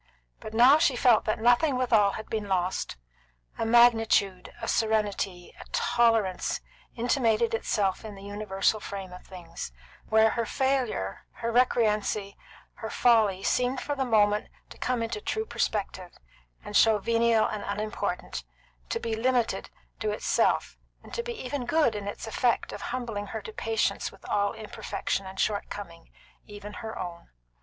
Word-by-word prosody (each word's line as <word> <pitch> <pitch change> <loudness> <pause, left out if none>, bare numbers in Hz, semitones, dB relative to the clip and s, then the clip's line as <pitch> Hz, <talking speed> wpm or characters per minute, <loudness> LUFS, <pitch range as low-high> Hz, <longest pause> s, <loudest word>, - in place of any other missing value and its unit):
But 215 0 -8
now 255 +6 +7
she 295 -5 +3
felt 240 -2 +4
that 215 - 0
nothing 245 +5 +3
withal 220 -6 +3
had 220 - -6
been 215 -2 -3
lost; 185 - -1 0.6
a 225 - 0
magnitude, 225 -5 +4
a 230 - -5
serenity, 205 -5 0
a - - -10
tolerance, 225 -6 +2 0.4
intimated 235 -2 +1
itself 205 -3 0
in 215 -2 -8
the 195 - -12
universal 205 +1 0
frame 195 -3 -7
of 180 - -11
things, 170 - -8 0.4
where 220 0 +5
her 235 -2 -1
failure, 255 - -1
her 230 - -3
recreancy, 215 -4 +1 0.4
her 220 - -5
folly, 215 -6 +3
seemed 250 +1 +1
for 290 - -3
the 275 -2 -1
moment 210 -3 +2 0.2
to - - -12
come 250 -2 0
into 225 -2 -4
true 440 - -2
perspective, 190 - -3 0.5
and - - -7
to - - +7
show 220 -1 +4
venial 230 +1 +3
and 210 - -3
unimportant, 200 - -3 0.5
to - - -1
be 230 -1 -2
limited 245 0 0 0.3
to 215 - -1
itself, 210 - +1 0.2
and - - -14
to 470 - -1
be 480 0 -5
even 260 +1 -3
good 310 -6 +3
in 205 -1 -5
its 205 - -5
effect 235 +2 0
of - - -7
humbling 235 -5 -4
her 220 +2 -5
to 220 - -8
patience 225 0 -1
with - - -15
all 205 0 +1
imperfection 205 -2 -4
and 190 0 -9
shortcoming, 200 -5 -3 0.4
even 205 0 -9
her 220 -1 -6
own. 175 -2 -7
220 Hz, 155 wpm, -28 LUFS, 200-235 Hz, 0.6 s, now